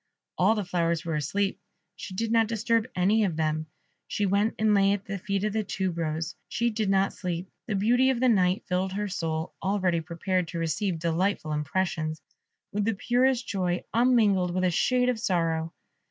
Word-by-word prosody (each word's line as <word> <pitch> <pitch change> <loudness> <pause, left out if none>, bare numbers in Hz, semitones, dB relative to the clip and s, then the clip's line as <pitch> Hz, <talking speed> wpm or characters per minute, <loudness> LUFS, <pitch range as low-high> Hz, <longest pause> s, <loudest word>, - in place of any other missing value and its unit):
All 195 +5 +3
the 210 -3 -2
flowers 170 -1 0
were 165 - -2
asleep. 195 +7 -1 0.4
She 185 - -8
did 225 +3 -1
not 225 -1 +4
disturb 230 +1 0
any 200 +5 +3
of 180 -6 0
them; 155 0 -1 0.4
she 205 - -1
went 200 +3 +1
and 215 -1 +3
lay 195 0 +4
at 200 -1 -4
the 195 -1 -4
feet 200 +2 -2
of 210 -1 0
the 220 0 0
Tube 190 -3 -2
rose 160 -1 -2 0.2
she 235 0 0
did 215 -2 -1
not 195 0 +2
sleep. 180 0 -4 0.2
The 215 - -1
beauty 245 +6 +3
of 260 -3 +1
the 255 - +3
night 185 -4 +3
filled 185 +1 -1
her 205 +1 -2
soul, 165 -3 -3
already 185 -4 +1
prepared 175 +2 -1
to 170 - -6
receive 165 +3 -1
delightful 170 0 0
impressions, 155 +1 -1 0.5
with 205 0 -1
the 225 -1 +1
purest 245 +3 +1
joy, 180 -3 -1
unmingled 215 -7 +3
with 185 - 0
a 180 - +3
shade 250 +8 +2
of 245 -3 -1
sorrow. 165 -5 0
190 Hz, 190 wpm, -27 LUFS, 170-215 Hz, 0.5 s, not